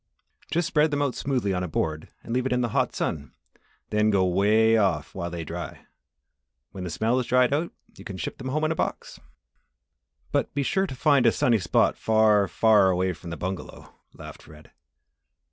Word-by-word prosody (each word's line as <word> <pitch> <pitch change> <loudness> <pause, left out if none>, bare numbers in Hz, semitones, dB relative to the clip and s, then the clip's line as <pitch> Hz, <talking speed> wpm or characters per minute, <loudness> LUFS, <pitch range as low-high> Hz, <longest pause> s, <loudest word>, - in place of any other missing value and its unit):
"Just 170 0 0
spread 155 -3 +2
them 145 -1 0
out 140 -3 -1
smoothly 125 -8 -1
on 90 - -1
a - - -3
board 80 0 -3
and 115 - -6
leave 130 +1 0
it - - -4
in 125 0 +1
the 120 - -1
hot - - 0
sun 70 -4 -3 0.6
then 105 0 +2
go 95 -3 +2
way 105 +5 +3
off 95 -9 0
while 85 -2 -4
they 85 -1 -5
dry. - - -7 0.9
When 95 - -7
the 90 - -4
smell 115 +9 0
is 125 - -3
dried 125 +1 +3
out 160 +4 -1 0.2
you - - -12
can 95 - -7
ship 85 - -5
them 130 - -6
home 150 +4 -1
in 155 - +1
a - - -1
box." - - -4 1.1
"But - - 0
be 140 - 0
sure 190 +7 0
you - - -6
find 140 -2 +3
a - - +6
sunny 115 -1 +2
spot 90 -2 +1
far, 110 -2 +3
far 105 +2 +4
away 90 0 0
from 85 +1 -10
the 85 - -6
bungalow," 95 +3 -7 0.2
laughed - - -11
Fred. 75 -1 -16
110 Hz, 200 wpm, -25 LUFS, 90-130 Hz, 1.1 s, a